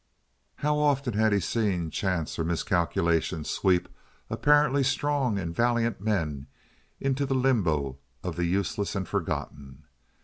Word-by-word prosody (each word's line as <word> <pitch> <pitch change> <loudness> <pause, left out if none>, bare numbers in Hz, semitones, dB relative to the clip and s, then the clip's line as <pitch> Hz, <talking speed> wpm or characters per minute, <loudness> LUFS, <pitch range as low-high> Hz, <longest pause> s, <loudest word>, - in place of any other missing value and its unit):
How 150 0 0
often 140 -4 +1
had 110 +1 +3
he 100 - +3
seen 95 -5 -1
chance 90 -2 -2
or - - +1
miscalculation 85 -1 0
sweep 90 +2 +1 0.4
apparently 145 -1 +4
strong 135 -3 +1
and 85 -3 -4
valiant 120 -2 +1
men 80 -10 -1 0.5
into 135 +1 0
the 135 -1 0
limbo 85 - +1 0.2
of 90 -3 -3
the 90 0 0
useless 100 +3 -1
and 95 -3 -2
forgotten! 70 -2 -4
100 Hz, 130 wpm, -27 LUFS, 85-130 Hz, 0.5 s, apparently